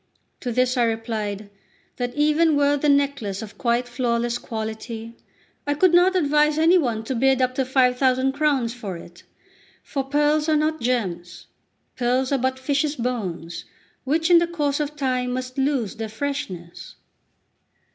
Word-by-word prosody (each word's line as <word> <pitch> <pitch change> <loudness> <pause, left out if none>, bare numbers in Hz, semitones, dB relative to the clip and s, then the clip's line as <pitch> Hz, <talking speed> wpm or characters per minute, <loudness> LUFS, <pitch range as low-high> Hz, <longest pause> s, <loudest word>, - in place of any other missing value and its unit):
To 245 - -3
this 255 +2 +1
I 245 - +4
replied, 215 -3 -3 0.5
that 245 -1 -3
"even 305 +1 +3
were 285 0 +3
the 290 +1 +1
necklace 280 -8 +1
of 215 - -11
quite 240 0 +1
flawless 240 -1 -1
quality, 225 0 -6 0.5
I 290 - +1
could 345 +3 +3
not 360 +2 +5
advise 300 -2 +3
any 335 +3 +5
one 235 -7 -1
to 245 - -3
bid 265 +2 +2
up 255 -1 +1
to 265 0 0
five 250 -1 +2
thousand 260 0 +2
crowns 275 -5 0
for 205 -8 -6
it; 170 +1 -13 0.6
for 275 -2 -3
pearls 295 +3 +1
are 310 - +4
not 310 -1 0
gems; 180 -9 -2 0.5
pearls 255 +2 +1
are 275 - +2
but 260 +1 0
fishes' 290 +3 0
bones, 190 - -4 0.4
which 320 +5 +1
in 345 - +8
the 340 - +1
course 295 -4 -1
of 300 0 -3
time 255 -3 -1
must 255 +1 -4
lose 265 -7 0
their 225 -1 -5
freshness. 215 -9 -5
255 Hz, 160 wpm, -23 LUFS, 230-290 Hz, 0.6 s, in